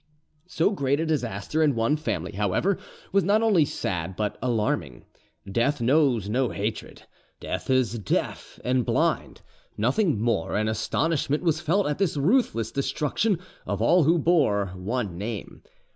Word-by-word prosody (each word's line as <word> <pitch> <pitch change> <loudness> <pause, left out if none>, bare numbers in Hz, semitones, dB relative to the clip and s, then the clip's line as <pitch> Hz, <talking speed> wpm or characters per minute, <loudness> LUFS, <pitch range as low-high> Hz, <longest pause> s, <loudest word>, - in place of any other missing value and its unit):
So 180 +1 +1
great 140 -7 0
a 165 - 0
disaster 125 -2 -1
in 150 -4 +3
one 115 +6 +2
family, 100 - -3
however, 105 - 0 0.3
was 195 -1 +3
not 210 +5 +3
only 195 -9 +4
sad 90 - -3
but 105 0 -2
alarming. 105 - -1 0.4
Death 120 +9 0
knows 125 -4 +2
no 125 +3 +1
hatred: 105 +2 -4 0.4
death - - -5
is 125 -4 +2
deaf 100 - -3
and 125 0 +1
blind, - - 0 0.4
nothing 130 - +1
more, 115 -7 0
and 110 +1 0
astonishment 145 - 0
was 165 -2 +1
felt 180 +5 +1
at 150 +2 -2
this 190 -6 0
ruthless 145 - +1
destruction 150 +8 0 0.3
of - - -2
all 175 -3 +4
who 165 +3 +4
bore 135 - +2
one 95 -1 -3
name. 105 +1 -6
130 Hz, 145 wpm, -25 LUFS, 105-160 Hz, 0.4 s, only